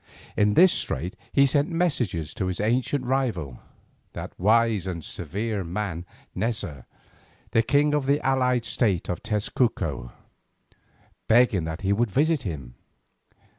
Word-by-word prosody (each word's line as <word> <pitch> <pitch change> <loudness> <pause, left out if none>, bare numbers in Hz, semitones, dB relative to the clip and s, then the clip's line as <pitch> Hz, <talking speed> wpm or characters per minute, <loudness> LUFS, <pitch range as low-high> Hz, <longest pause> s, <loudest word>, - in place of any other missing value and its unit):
In 105 0 +2
this 185 0 +7
strait 90 - -2 0.2
he 140 - +5
sent 145 +2 +2
messengers 130 - -1
to 100 -5 -2
his 90 - -2
ancient 125 +5 0
rival, 115 - -1 0.5
that - - -7
wise 110 0 +3
and 85 -3 -4
severe 105 +1 -3
man 90 -1 -4 0.3
Neza, 95 - -2 0.7
the 115 - +4
king 145 +5 +2
of 145 -3 0
the 140 +1 +3
allied 125 -2 +2
state 100 -8 0
of 90 - -3
Tezcuco, 105 - -1 1.2
begging 110 -7 +4
that 80 +1 -5
he 100 +1 +1
would 115 +2 +1
visit 150 - +2
him. 70 - -6
110 Hz, 135 wpm, -25 LUFS, 90-130 Hz, 1.2 s, this